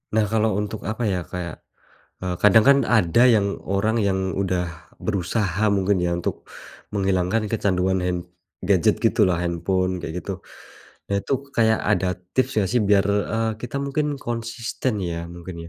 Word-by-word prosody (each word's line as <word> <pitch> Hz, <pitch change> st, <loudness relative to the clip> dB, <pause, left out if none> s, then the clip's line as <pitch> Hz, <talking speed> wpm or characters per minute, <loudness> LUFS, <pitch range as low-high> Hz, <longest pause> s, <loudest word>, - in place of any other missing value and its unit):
Nah 110 Hz, -1 st, +3 dB
kalau 110 Hz, -1 st, +1 dB
untuk 105 Hz, +1 st, -4 dB
apa 110 Hz, +2 st, -3 dB
ya 90 Hz, -3 st, -1 dB
kayak, 85 Hz, -1 st, -7 dB, 0.6 s
eee, 90 Hz, -1 st, -1 dB
kadang 105 Hz, +2 st, +7 dB
kan 140 Hz, +3 st, +6 dB
ada 110 Hz, -2 st, +3 dB
yang 105 Hz, -5 st, +3 dB
orang 105 Hz, +4 st, +1 dB
yang 100 Hz, -3 st, +1 dB, 0.2 s
udah 90 Hz, -3 st, 0 dB, 0.3 s
berusaha 100 Hz, 0 st, 0 dB
mungkin 100 Hz, 0 st, +2 dB
ya 90 Hz, -1 st, 0 dB
untuk 85 Hz, -, -4 dB, 0.5 s
menghilangkan 95 Hz, +2 st, 0 dB
kecanduan 95 Hz, -3 st, +1 dB
hand 90 Hz, -1 st, -3 dB, 0.3 s
gadget 100 Hz, +4 st, +2 dB
gitulah, 105 Hz, -5 st, +3 dB
handphone 90 Hz, +2 st, 0 dB
kayak 85 Hz, +1 st, -5 dB
gitu. 95 Hz, +1 st, -5 dB, 0.7 s
Nah 100 Hz, -, +2 dB
itu -, -, -4 dB, 0.2 s
kayak 110 Hz, -1 st, +3 dB
ada 100 Hz, -2 st, +2 dB, 0.3 s
tips 130 Hz, -, +3 dB
gak 95 Hz, -, 0 dB
sih 125 Hz, -, +3 dB
biar, 100 Hz, -1 st, +5 dB, 0.3 s
eee, 115 Hz, 0 st, +1 dB
kita 125 Hz, +3 st, -5 dB
mungkin 145 Hz, +1 st, -1 dB
konsisten 115 Hz, -2 st, -3 dB
ya 85 Hz, -1 st, -3 dB
mungkin 85 Hz, 0 st, -8 dB
100 Hz, 155 wpm, -23 LUFS, 90-110 Hz, 0.7 s, kadang